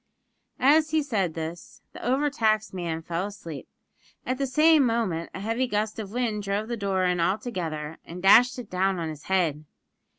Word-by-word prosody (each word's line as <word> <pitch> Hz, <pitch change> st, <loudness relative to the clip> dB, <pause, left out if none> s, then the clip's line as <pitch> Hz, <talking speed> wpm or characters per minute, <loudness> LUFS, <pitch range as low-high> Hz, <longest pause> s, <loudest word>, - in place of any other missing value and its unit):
As 305 Hz, +4 st, +4 dB
he 310 Hz, -1 st, +1 dB
said 195 Hz, -, -1 dB
this 165 Hz, +1 st, -7 dB
the -, -, -10 dB
over 275 Hz, +4 st, +1 dB
taxed 215 Hz, -6 st, +1 dB
man 170 Hz, -3 st, -3 dB
fell 170 Hz, +4 st, -2 dB
asleep; 170 Hz, -8 st, -9 dB, 0.6 s
at 255 Hz, +1 st, -2 dB
the 275 Hz, -, 0 dB
same 305 Hz, +3 st, +5 dB
moment 225 Hz, -9 st, 0 dB
a -, -, -5 dB
heavy 225 Hz, +5 st, -1 dB
gust 215 Hz, -1 st, -2 dB
of 205 Hz, -3 st, -6 dB
wind 230 Hz, -3 st, -1 dB
drove 200 Hz, +2 st, -2 dB
the 240 Hz, -, -2 dB
door 195 Hz, -3 st, -1 dB
in 180 Hz, -1 st, +1 dB
altogether, 170 Hz, -5 st, -2 dB
and 175 Hz, +2 st, -9 dB
dashed 240 Hz, +7 st, +6 dB
it 245 Hz, -4 st, -8 dB
down 190 Hz, +1 st, +1 dB
on 165 Hz, -2 st, -3 dB
his 155 Hz, -1 st, -9 dB
head. 170 Hz, -6 st, 0 dB
200 Hz, 185 wpm, -26 LUFS, 175-245 Hz, 0.6 s, dashed